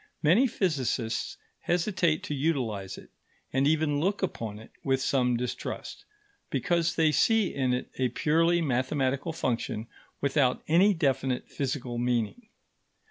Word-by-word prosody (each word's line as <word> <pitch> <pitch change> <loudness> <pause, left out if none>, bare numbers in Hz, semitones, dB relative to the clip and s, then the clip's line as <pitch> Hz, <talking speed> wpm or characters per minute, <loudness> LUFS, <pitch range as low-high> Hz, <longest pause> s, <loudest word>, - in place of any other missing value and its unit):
Many 190 - +5
physicists 130 - -1 0.2
hesitate 175 -2 +1
to - - -3
utilize 125 - -1
it, - - -14 0.4
and 135 +1 +3
even 155 -1 +2
look 195 +5 0
upon 115 - -3
it 110 - -13
with 135 -1 +1
some 125 -2 +1
distrust, 125 +1 -5 0.4
because 170 -1 0
they 160 -2 +3
see 220 +4 +3
in 130 -2 0
it 125 0 -2
a 130 -1 +2
purely 165 +6 +2
mathematical 135 +2 0
function 115 -6 -2 0.3
without 140 -2 +1
any 185 +6 +5
definite 135 -5 0
physical 130 -3 -3
meaning. 120 - -1
140 Hz, 130 wpm, -28 LUFS, 125-165 Hz, 0.4 s, Many